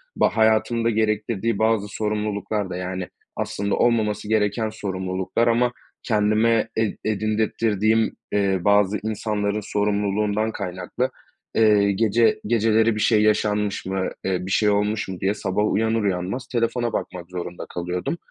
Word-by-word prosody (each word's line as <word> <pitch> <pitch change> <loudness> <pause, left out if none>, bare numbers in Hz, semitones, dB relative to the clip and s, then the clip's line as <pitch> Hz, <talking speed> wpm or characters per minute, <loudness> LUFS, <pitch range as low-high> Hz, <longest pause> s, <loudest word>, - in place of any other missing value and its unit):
Ba - - +1
hayatımda 110 +1 +3
gerektirdiği 110 0 0
bazı 110 -2 +2
sorumluluklar 105 -1 -2
da, 90 - -4
yani, 90 -1 -4 0.3
aslında 100 0 -2
olmaması 105 -3 +1
gereken 110 0 +1
sorumluluklar 95 +2 -2
ama 120 +1 +3 0.3
kendime 110 +1 +2
ed 110 -2 0
edindirttirdiğim, 110 +1 +1 0.2
eee, 100 -2 +1
bazı 100 +1 +3
insanların 105 -1 -1
sorumluluğundan 105 +1 0
kaynaklı, 95 +6 -3 0.5
eee, 105 -2 +4
gece 115 +3 +2
geceleri 110 0 +3
bir - - -3
şey 110 -2 +4
yaşanmış 105 -2 +1
mı, 95 0 -1 0.2
eee, 90 -1 -1
bir 95 - -5
şey 105 +1 +3
olmuş 105 +1 0
mu 95 -2 -6
diye 100 +2 +1
sabah 105 +1 -1
uyanır 110 0 +1
uyanmaz 95 +6 -2
telefona 120 0 -1
bakmak 90 -1 -4
zorunda 90 -1 -6
kalıyordum. 90 - -3
105 Hz, 130 wpm, -23 LUFS, 100-110 Hz, 0.5 s, eee